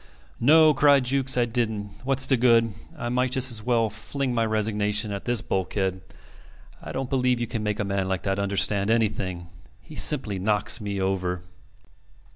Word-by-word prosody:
"No," 155 +4 +5
cried 140 -1 +4
Jukes, 130 0 +1
"I 120 - +3
didn't. 110 -4 -3
What's 135 0 +3
the 135 - +2
good? 115 -2 +3 0.2
I 120 - -4
might 125 +1 0
just 130 -1 +1
as 110 -2 -3
well 115 0 +1
fling 130 +4 -4
my 115 -1 +1
resignation 105 -1 0
at 100 -1 -6
this 120 -3 0
bulkhead. 95 0 -2 0.8
I - - -8
don't 135 -1 -4
believe 125 -2 +1
you 120 - -1
can 115 -1 -5
make 105 +1 -2
a 105 - -1
man 100 -1 -2
like 95 -1 -3
that 95 0 -1
understand 100 +1 +1
anything. 95 -6 -1 0.3
He 155 - -16
simply 115 -13 +1
knocks 105 +3 +2
me 100 -1 -4
over." 95 -2 -2
110 Hz, 175 wpm, -24 LUFS, 100-125 Hz, 0.8 s, No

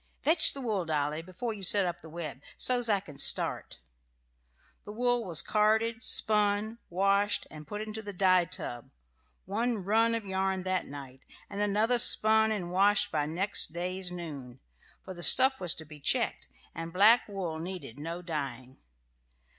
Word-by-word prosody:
Fetch 315 0 +2
the 275 - -7
wool, 215 -7 -2
Dolly, 150 -1 -2
before 185 +7 -6
you 205 - -10
set 195 +1 +3
up 175 -1 -4
the 160 - -12
web, 155 -4 -7 0.2
so's 245 -2 +3
I 200 -2 +1
can 145 -7 -13
start." - - +2 1.1
The 205 - -9
wool 245 +2 0
was 170 -6 +4
carded, 220 +2 +1
spun, 210 +1 +1
washed, 200 +3 +1
and 155 -1 -11
put 210 +4 -6
into 215 0 -6
the 205 -1 -7
dye 185 -2 +2
tub, 120 -9 -6 0.6
one 220 +1 -2
"run" 225 +3 +2
of 225 -2 -5
yarn 190 -1 -2
that 185 0 -2
night; 135 -2 -10 0.3
and 200 - -4
another 215 +4 +1
spun 220 -1 +5
and 180 -5 -3
washed 200 +2 +2
by 145 - -1
next 175 0 +1
day's 180 +1 -4
noon 145 -8 -8 0.4
for 190 - -8
the 175 - -10
stuff 265 +7 +5
was 175 -3 0
to 160 - -9
be 150 0 -13
checked, - - 0 0.3
and 165 0 -7
black 210 +7 +4
wool 185 -6 -5
needed 170 -7 -8
no 165 +4 -6
dyeing. 135 -6 -6
190 Hz, 165 wpm, -29 LUFS, 165-215 Hz, 1.1 s, spun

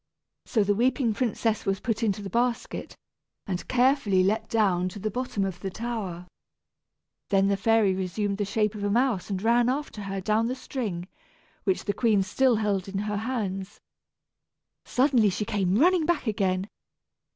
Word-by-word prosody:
So 220 -4 +2
the 205 +1 +2
weeping 240 +1 +1
princess 225 -1 0
was 195 -2 0
put 225 -2 -2
into 205 -2 0
the 195 - -5
basket, 240 +2 -2 0.5
and 180 -2 -4
carefully 245 -7 +3
let 215 +3 0
down 185 -5 +2
to 185 - -10
the 210 +2 -3
bottom 245 -4 -2
of 185 -2 -4
the 195 - -4
tower. 195 -5 -4 1.0
Then 195 0 +3
the 200 - +3
fairy 215 -1 +3
resumed 195 +2 -2
the - - +1
shape 210 +1 0
of 210 -2 -6
a 205 - +1
mouse 230 -4 +1
and 195 -2 -2
ran 235 +1 +4
after 270 -5 -3
her 195 -1 -4
down 215 +4 +1
the 255 - -2
string, 210 -10 -4 0.6
which 190 -3 0
the 205 - 0
queen 210 -2 +2
still 250 +6 +2
held 205 -3 0
in 195 - -4
her 210 +1 -2
hands. 200 -4 -3 1.1
Suddenly 250 -5 +3
she 200 +3 -2
came 200 -3 +1
running 340 +3 +4
back 345 -5 +1
again. 195 -3 0
210 Hz, 170 wpm, -26 LUFS, 195-235 Hz, 1.1 s, ran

